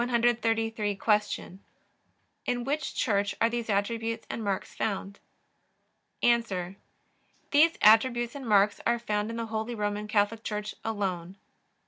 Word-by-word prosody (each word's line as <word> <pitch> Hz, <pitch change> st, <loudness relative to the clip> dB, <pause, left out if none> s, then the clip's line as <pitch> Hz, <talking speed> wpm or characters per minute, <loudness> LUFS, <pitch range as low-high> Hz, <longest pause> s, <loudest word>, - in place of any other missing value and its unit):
Q. 225 Hz, -5 st, 0 dB, 0.9 s
In 245 Hz, -1 st, 0 dB
which 280 Hz, +2 st, -2 dB
Church 200 Hz, -3 st, +1 dB
are 230 Hz, -, +4 dB
these 235 Hz, -1 st, -3 dB
attributes 225 Hz, +3 st, -1 dB
and 225 Hz, -, -4 dB
marks 195 Hz, -2 st, -2 dB
found? 200 Hz, -1 st, -3 dB, 1.0 s
A. 195 Hz, -7 st, +1 dB, 0.8 s
These 315 Hz, +3 st, +5 dB
attributes 240 Hz, +2 st, +5 dB
and 270 Hz, -5 st, -7 dB
marks 205 Hz, 0 st, +4 dB
are 235 Hz, 0 st, +3 dB
found 210 Hz, -2 st, -2 dB
in 230 Hz, -, -5 dB
the 230 Hz, 0 st, -3 dB
Holy 220 Hz, +2 st, -3 dB
Roman 210 Hz, 0 st, -2 dB
Catholic 215 Hz, +1 st, +1 dB
Church 210 Hz, 0 st, -4 dB
alone. 190 Hz, -4 st, -3 dB
220 Hz, 120 wpm, -28 LUFS, 205-235 Hz, 1.0 s, These